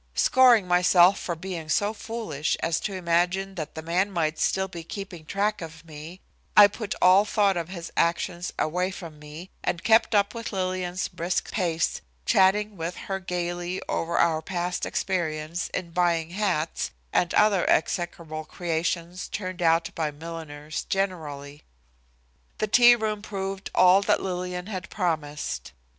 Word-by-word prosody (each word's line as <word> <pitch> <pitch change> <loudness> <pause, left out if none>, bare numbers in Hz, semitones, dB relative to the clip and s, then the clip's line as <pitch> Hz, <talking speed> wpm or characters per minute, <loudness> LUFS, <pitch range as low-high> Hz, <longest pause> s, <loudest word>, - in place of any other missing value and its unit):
Scoring 245 -7 +5
myself 180 +1 +5
for 170 - -3
being 165 -2 -6
so 205 +6 +1
foolish 220 -11 -3
as 165 -1 0
to 200 - -4
imagine 180 +2 0
that 155 -5 -6
the 160 - -6
man 180 +5 +1
might 160 -4 -1
still 190 0 +1
be 170 -3 -8
keeping 175 -3 -8
track 205 +2 0
of 160 0 -9
me, 160 +3 -10 0.4
I 205 - +11
put 210 0 -5
all 185 +2 +7
thought 205 -2 +2
of 170 -1 -3
his 170 -3 -7
actions 170 +1 0
away 180 +4 0
from 170 -5 -9
me 150 +5 -10
and 170 - -2
kept 225 0 +4
up 200 0 +3
with 230 -1 -5
Lillian's 185 -1 -2
brisk 175 +2 -2
pace, 170 -5 0 0.2
chatting 205 +2 +3
with 165 +2 -4
her 195 -1 -4
gayly 175 0 -3
over 170 +1 -1
our 160 -2 +3
past 175 +1 -3
experience 170 -2 -2
in 175 -2 -4
buying 170 -2 +1
hats 180 -5 -1 0.2
and 175 - +2
the 205 -3 +3
execrable 160 -2 -1
creations 170 +2 -3
turned 185 -2 -5
out 165 0 +3
by 160 -2 -1
milliners 155 -1 -7
generally. 150 -7 -3 1.0
The - - 0
tea 240 +3 +7
room 215 -2 -2
proved 195 -2 -5
all 185 +2 +6
that 205 +1 +2
Lillian 180 -1 -4
had 190 -3 -6
promised. 150 - -3
180 Hz, 150 wpm, -26 LUFS, 165-195 Hz, 1.0 s, I